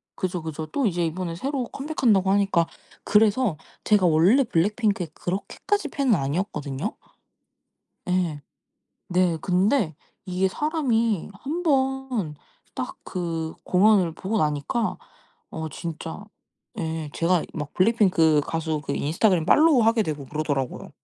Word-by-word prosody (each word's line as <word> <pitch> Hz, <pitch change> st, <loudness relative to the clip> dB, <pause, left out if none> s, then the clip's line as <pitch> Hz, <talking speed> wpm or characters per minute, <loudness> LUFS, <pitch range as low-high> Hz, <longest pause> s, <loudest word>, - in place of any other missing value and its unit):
그죠, 180 Hz, -2 st, -2 dB
그죠. 160 Hz, 0 st, -5 dB
또 270 Hz, -, -1 dB
이제 175 Hz, -3 st, 0 dB
이번에 170 Hz, +1 st, -3 dB
새로 265 Hz, +6 st, -2 dB
컴백한다고 235 Hz, -9 st, +1 dB
하니까 195 Hz, -4 st, +2 dB, 0.4 s
그래서 210 Hz, -3 st, +3 dB, 0.3 s
제가 210 Hz, -3 st, +3 dB
원래 175 Hz, -, +5 dB
블랙핑크에 205 Hz, -1 st, 0 dB
그렇게까지 300 Hz, -, -2 dB
팬은 265 Hz, -5 st, +2 dB
아니었거든요. 145 Hz, -2 st, -3 dB, 1.1 s
예. 175 Hz, -5 st, 0 dB, 0.7 s
네 180 Hz, -2 st, +2 dB
근데 185 Hz, -, +1 dB, 0.3 s
이게 185 Hz, 0 st, +1 dB
사람이 235 Hz, -, 0 dB
1 300 Hz, -, -4 dB
번 265 Hz, -, 0 dB, 0.4 s
딱 -, -, -4 dB
그 165 Hz, -3 st, -3 dB
공연을 185 Hz, -2 st, +4 dB
보고 195 Hz, +6 st, -2 dB
나니까 155 Hz, -, 0 dB, 0.5 s
어 160 Hz, 0 st, -5 dB
진짜 165 Hz, +4 st, -6 dB, 0.6 s
예 160 Hz, -3 st, -3 dB
제가 170 Hz, 0 st, +2 dB
막 150 Hz, -2 st, -5 dB
블랙핑크 185 Hz, -7 st, +4 dB
가수 160 Hz, -1 st, -2 dB
그 140 Hz, -1 st, -3 dB
인스타그램 170 Hz, +4 st, +2 dB
팔로우하게 240 Hz, -, +5 dB
되고 150 Hz, -5 st, -4 dB
그러더라고요. 145 Hz, -3 st, -3 dB
185 Hz, 275 characters per minute, -24 LUFS, 160-225 Hz, 1.1 s, 원래